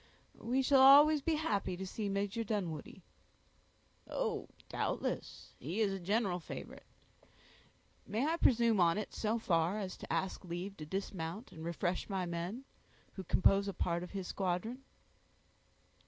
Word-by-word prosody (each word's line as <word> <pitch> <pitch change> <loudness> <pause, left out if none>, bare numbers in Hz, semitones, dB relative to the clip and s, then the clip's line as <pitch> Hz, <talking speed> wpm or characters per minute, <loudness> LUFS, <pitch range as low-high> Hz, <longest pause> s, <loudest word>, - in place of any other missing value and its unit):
"We 255 +3 0
shall 270 0 +5
always 290 +3 +8
be 320 +3 +1
happy 205 - -1
to 190 - -4
see 205 +2 -3
Major 200 +3 -1
Dunwoodie." 185 -9 -4 1.0
"Oh! - - -2 0.2
doubtless; - - -3
he 165 - -4
is 205 -3 +2
a 195 - -4
general 195 0 0
favorite, 165 - -9 1.2
May 225 +6 0
I 325 +2 +1
presume 235 - +4
on 170 +1 +4
it 210 - -4
so 220 +1 0
far 175 -3 +1
as 195 -3 -4
to - - -8
ask 190 - -1
leave 180 +3 -5
to 155 - -8
dismount 190 +3 -4
and 160 - -9
refresh 175 +3 -2
my 190 -2 -1
men, 175 +8 -4 0.5
who 190 - -6
compose 195 +3 +3
a 200 - -2
part 170 0 -1
of 180 - -6
his 195 -2 -5
squadron?" 195 +6 -2
195 Hz, 150 wpm, -34 LUFS, 175-230 Hz, 1.2 s, always